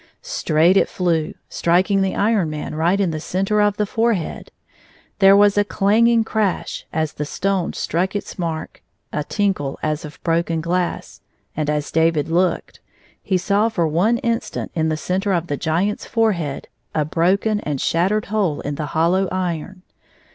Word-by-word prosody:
Straight 180 - +2
it - - +3
flew, 170 -4 -1
striking 185 +3 +2
the 190 -1 0
Iron 205 -5 +2
Man 150 0 -5
right 170 +5 +1
in 190 -4 +1
the 155 - -3
center 195 +6 0
of 205 -1 +2
the 210 - +1
forehead. 225 -5 -1 0.7
There 195 0 +7
was 205 0 +5
a - - +4
clang 210 +3 +3
ing 230 -1 +4
crash 215 -4 -2
as 155 -1 -1
the 150 - -4
stone 190 +4 -1
struck 185 +4 -1
its 205 - -5
mark, 165 -2 -4 0.3
a 150 - -1
tinkle 185 -7 -1
as 155 +2 -1
of 150 -1 -10
broken 165 -1 0
glass, 175 +2 -2 0.3
and, 150 -1 -1
as 150 -1 -1
David 160 -2 +2
looked, 175 +2 0 0.4
he 190 - 0
saw 205 +4 +1
for 175 -7 0
one 185 +10 +2
instant 235 -2 -2
in 160 -1 0
the 155 - -1
center 190 +4 -1
of 170 -2 0
the 145 - -2
Giant's 170 +8 -1
forehead 190 - 0 0.3
a 155 -2 +1
broken 190 +7 +1
and 150 -8 -3
shattered 190 +9 +1
hole 200 -8 0
in 145 - -3
the 150 +1 -4
hollow 180 +4 +2
iron. 185 0 -3
180 Hz, 170 wpm, -20 LUFS, 160-205 Hz, 0.7 s, There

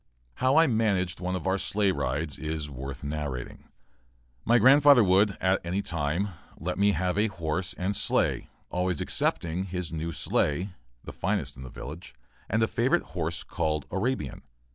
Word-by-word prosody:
How 130 +2 +3
I 165 - +7
managed 100 - +1
at - - -9
one 90 +1 -1
of 90 - -5
our 95 +1 +1
sleigh 100 0 +1
rides 75 -1 -2
is 75 -2 -4
worth 70 0 -7
narrating. 70 -4 -5 0.8
My 120 +1 +4
grandfather 140 0 +7
would, 100 +2 +3
at 95 +1 +2
any 90 +4 -1
time, 85 +2 -1 0.3
let 90 +4 -3
me 100 0 +4
have 90 +3 0
a 110 - +3
horse 90 -1 -3
and 95 +3 -2
sleigh, 105 - +1 0.2
always 90 -3 0
excepting 85 +3 -1
his 90 -3 -4
new 80 +1 -3
sleigh, 85 +4 0 0.3
the - - -8
finest - - -2
in 65 - -11
the 65 - -7
village, 75 +2 -9 0.3
and 110 +2 +2
a - - +3
favorite 125 +10 +1
horse 85 -1 -2
called 75 -2 -2
"Arabian." 100 - -2
90 Hz, 165 wpm, -28 LUFS, 80-100 Hz, 0.8 s, I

